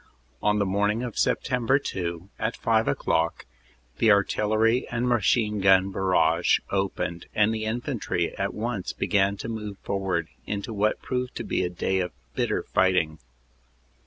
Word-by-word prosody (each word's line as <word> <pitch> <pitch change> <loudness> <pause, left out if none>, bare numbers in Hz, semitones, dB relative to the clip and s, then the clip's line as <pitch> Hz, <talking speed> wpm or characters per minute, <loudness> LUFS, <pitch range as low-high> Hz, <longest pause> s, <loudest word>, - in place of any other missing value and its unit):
"On 105 0 +2
the 100 - +2
morning 105 +4 +1
of 120 -3 -4
Sept. - - +1 0.4
2, 85 0 -4
at 110 +2 -2
five 115 -2 +2
o 70 - +2
clock, 80 +1 0 0.5
the 115 - +4
artillery 110 +4 +2
and 120 +1 -1
machine 105 -2 +2
gun 95 0 +5
barrage 85 -3 +3
opened, 95 -3 -2
and 105 +1 +3
the 110 -1 -3
infantry 115 - -2
at 100 0 -2
once 110 -3 -3
began 100 0 +1
to - - -6
move 105 -3 -5
forward 95 -4 -1 0.2
into 105 +2 -3
what 105 +1 0
proved 125 -1 -3
to - - -4
be - - -1
a 90 - -1
day 95 +2 -1
of 90 -3 -2 0.2
bitter - - 0
fight 95 0 +2
ing. 80 -2 0
100 Hz, 160 wpm, -26 LUFS, 95-110 Hz, 0.5 s, gun